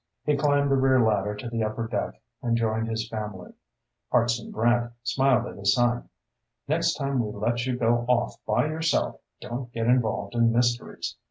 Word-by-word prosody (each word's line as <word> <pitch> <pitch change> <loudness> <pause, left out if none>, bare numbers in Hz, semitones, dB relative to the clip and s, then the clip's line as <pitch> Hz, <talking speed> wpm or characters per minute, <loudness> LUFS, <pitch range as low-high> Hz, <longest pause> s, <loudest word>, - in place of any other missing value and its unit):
He 150 - +2
climbed 145 -1 +2
the 135 - +4
rear 130 0 +4
ladder 105 -3 +2
to 105 +3 -7
the 115 -1 -1
upper 110 +1 -2
deck 105 -3 -3 0.2
and 120 -2 +1
joined 110 0 0
his 110 0 -2
family. 105 -5 -6 0.6
Hartson 120 -1 +1
Brant 120 +1 +1
smiled 130 -1 +2
at - - -8
his 100 0 +3
son. 120 -1 +1 0.6
"Next 165 +3 +1
time 135 -3 0
we 105 - -4
let 120 +4 -1
you 125 -1 -1
go 120 0 +2
off 125 -1 0
by 120 +6 +2
yourself 160 +1 0 0.2
don't 120 0 -5
get 115 0 -1
involved 115 -5 +1
in 115 -1 +3
mysteries. 120 0 -1
120 Hz, 175 wpm, -26 LUFS, 110-130 Hz, 0.6 s, the